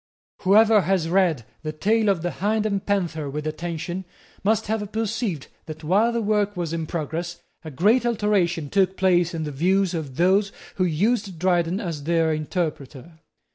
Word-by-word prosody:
Whoever 210 +2 +5
has 180 -2 0
read 170 - +2 0.2
the 155 - -4
tale 215 +7 +1
of 180 -5 +1
the 175 - -1
Hind 215 +3 -1
and 200 -2 -1
Panther 170 -7 -1
with 150 +2 -5
attention 170 +3 -4 0.4
must 220 +2 +2
have 210 -1 -3
perceived 215 - -2 0.2
that, 155 0 -8
while 205 +9 +3
that 235 -1 -1
work 205 -1 0
was 170 -2 -3
in 165 -1 -3
progress, 170 +2 -4 0.2
a 160 - -7
great 205 - +3
alteration 195 -9 0
took 190 -1 +2
place 175 -2 +2
in 160 - -3
the 150 - -4
views 185 +6 +1
of 150 -6 -5
those 195 +5 +3 0.3
who 185 - +2
used 195 +3 0
Dryden 175 +1 +1
as 165 -8 -5
their 165 -1 +2
interpreter. 155 -1 -4
180 Hz, 170 wpm, -23 LUFS, 160-205 Hz, 0.4 s, Whoever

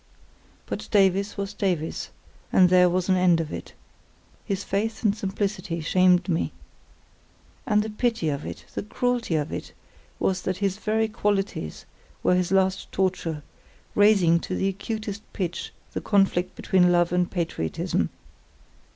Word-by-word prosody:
But - - -5
Davies 195 0 +3
was 200 0 -3
Davies, 180 -6 -2 0.4
and 185 -1 +6
there 180 -1 +6
was 180 +1 0
an 190 - +4
end 180 -2 +4
of 160 -2 -3
it; - - -7 0.7
his 200 -2 -2
faith 220 +4 -2
and 210 -2 +3
simplicity 195 -4 -2
shamed 180 +2 +3
me. 170 -3 0 1.1
And 210 -3 +3
the 220 - -4
pity 225 -6 0
of 145 0 -3
it, - - -7
the - - -2
cruelty 245 -3 -1
of 150 0 -1
it, - - -6 0.4
was 185 -1 0
that 185 0 -2
his 195 -1 0
very 220 +1 +1
qualities 205 - -2 0.4
were - - +4
his 180 0 +1
last 190 0 +1
torture, 175 -5 -1 0.5
raising 195 -5 +5
to 185 - -4
the 195 - +1
acutest 215 +1 -4
pitch 175 -3 -3 0.2
the - - -3
conflict 195 -3 +2
between 180 -2 +3
love 175 -1 +3
and 180 0 +2
patriotism. 165 - -1
190 Hz, 145 wpm, -25 LUFS, 175-205 Hz, 1.1 s, and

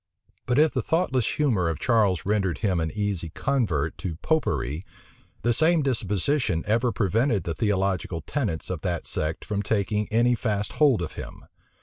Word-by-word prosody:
But 125 +1 +1
if 155 +1 +5
the - - -1
thoughtless 130 -8 0
humor 110 - +2
of 80 - -2
Charles 105 -8 +2
rendered 100 -3 +1
him 95 -6 0
an 80 -1 -1
easy 100 -4 -2
convert 85 - -1
to 90 -5 -4
Popery, 85 - 0 0.6
the 120 - +3
same 160 +4 +3
disposition 110 - 0
ever 115 +3 +2
prevented 110 +2 +1
the 85 - -2
theological 95 -2 -1
tenets 105 - -3
of 85 -4 -4
that 90 -3 -2
sect 75 +1 -3
from 105 -1 -1
taking 105 0 0
any 120 +2 +3
fast 105 -3 -1
hold 135 -11 +5
of 80 - -5
him. - - -9
105 Hz, 160 wpm, -25 LUFS, 90-125 Hz, 0.6 s, if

